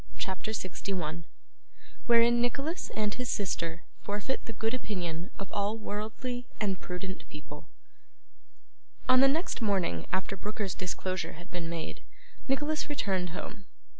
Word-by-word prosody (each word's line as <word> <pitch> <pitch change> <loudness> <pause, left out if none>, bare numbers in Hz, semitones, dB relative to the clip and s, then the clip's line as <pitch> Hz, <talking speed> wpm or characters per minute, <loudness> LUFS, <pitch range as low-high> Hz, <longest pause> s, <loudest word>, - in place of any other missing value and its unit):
CHAPTER 190 +3 -1
61 180 -5 -2 0.8
Wherein 235 0 +7
Nicholas 280 +8 0
and 210 -1 +2
his 250 -1 -2
Sister 170 -4 0 0.2
forfeit 205 +6 -1
the 230 - -4
good 225 +2 +1
Opinion 180 -8 -2
of 195 - -5
all 205 +2 +1
worldly 225 +4 -3
and 195 -4 +1
prudent 185 +1 -4
People 150 0 -9 1.4
On 255 0 +8
the 270 - +9
next 310 +1 +2
morning 185 - +2
after 190 +1 +1
Brooker's 205 0 -2
disclosure 185 0 -1
had 175 +2 -11
been 175 -2 -2
made, 165 -1 -3 0.5
Nicholas 295 +3 +2
returned 190 -10 +1
home. 195 +4 -6
205 Hz, 130 wpm, -32 LUFS, 180-235 Hz, 1.4 s, the